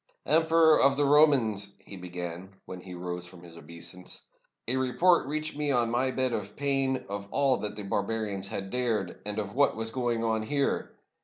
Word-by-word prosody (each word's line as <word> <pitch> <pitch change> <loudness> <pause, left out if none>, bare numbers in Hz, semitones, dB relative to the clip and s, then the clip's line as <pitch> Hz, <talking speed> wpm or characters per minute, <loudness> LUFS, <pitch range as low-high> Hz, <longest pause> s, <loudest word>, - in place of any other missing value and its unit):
"Emperor 160 0 +5
of 135 0 +4
the 145 - +3
Romans," 130 -9 +4
he 100 - -11
began, 90 +1 -7
when 90 -1 -8
he 90 -1 -9
rose 90 0 -5
from 90 -1 -14
his 85 -1 -13
obeisance, 85 +3 -4 0.4
"a 125 - +3
report 130 +7 +3
reached 155 +1 -3
me 150 0 -1
on 120 -4 +2
my 125 +2 +1
bed 130 -1 0
of 105 -2 -4
pain 135 -2 0
of 100 0 -5
all 135 0 +2
that 105 0 -5
the 105 - -6
barbarians 100 0 -2
had 95 -1 -5
dared, 115 -7 -1
and 105 0 -4
of 100 -2 -3
what 140 +2 +3
was 115 0 -2
going 120 -2 -1
on 110 -1 0
here. 140 +5 -1
115 Hz, 185 wpm, -28 LUFS, 95-135 Hz, 0.4 s, Emperor